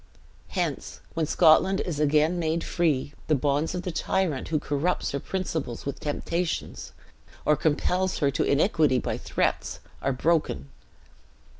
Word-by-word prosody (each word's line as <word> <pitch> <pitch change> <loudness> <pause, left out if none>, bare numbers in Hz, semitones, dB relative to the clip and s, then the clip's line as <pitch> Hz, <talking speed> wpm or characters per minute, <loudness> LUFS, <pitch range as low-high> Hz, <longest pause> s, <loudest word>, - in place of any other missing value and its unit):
Hence - - -3
when 160 -2 0
Scotland 180 +5 +5
is 160 -5 -3
again 155 +3 +3
made 165 0 0
free, 150 -5 0
the 155 - +3
bonds 145 +4 0
of 180 - -3
the 180 - -3
tyrant 165 -3 -1
who 155 - +1
corrupts 145 +5 -1
her 140 - -2
principles 160 -8 -3
with 140 - -4
temptations, 165 +3 -3 0.5
or 150 - +5
compels 180 +5 0
her 140 -2 +2
to - - 0
iniquity 150 -3 +3
by - - -2
threats, - - -1 0.2
are 135 - +1
broken. 140 - 0
155 Hz, 140 wpm, -26 LUFS, 140-175 Hz, 0.5 s, Scotland